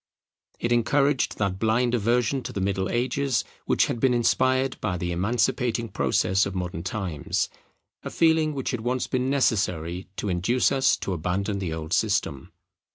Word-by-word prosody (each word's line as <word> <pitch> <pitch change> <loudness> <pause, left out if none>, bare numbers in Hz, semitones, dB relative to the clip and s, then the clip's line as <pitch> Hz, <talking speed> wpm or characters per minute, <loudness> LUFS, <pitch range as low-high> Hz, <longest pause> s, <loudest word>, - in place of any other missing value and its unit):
It 120 - -2
encouraged 140 +3 +2
that 100 -2 -1
blind 115 +3 +1
aversion 120 +3 +1
to - - -6
the - - -4
Middle 95 0 -1
Ages, 130 +1 0 0.2
which - - +3
had 120 - -3
been 125 0 +3
inspired 130 +2 +1
by 95 -4 -1
the 90 0 -3
emancipating 115 +5 0
process 90 +9 +1
of 100 - -6
modern 90 -2 -3
times; 90 -4 -2 0.5
a - - -6
feeling 160 -2 +2
which 135 - -2
had 125 -4 -3
once 125 +2 -1
been 130 0 -1
necessary 95 - 0
to 105 - -4
induce 95 +8 +1
us 135 -1 +3
to 95 - -3
abandon 95 +4 -2
the 90 -4 -3
old 80 +1 -4
system. 100 -11 0
110 Hz, 160 wpm, -25 LUFS, 95-125 Hz, 0.5 s, which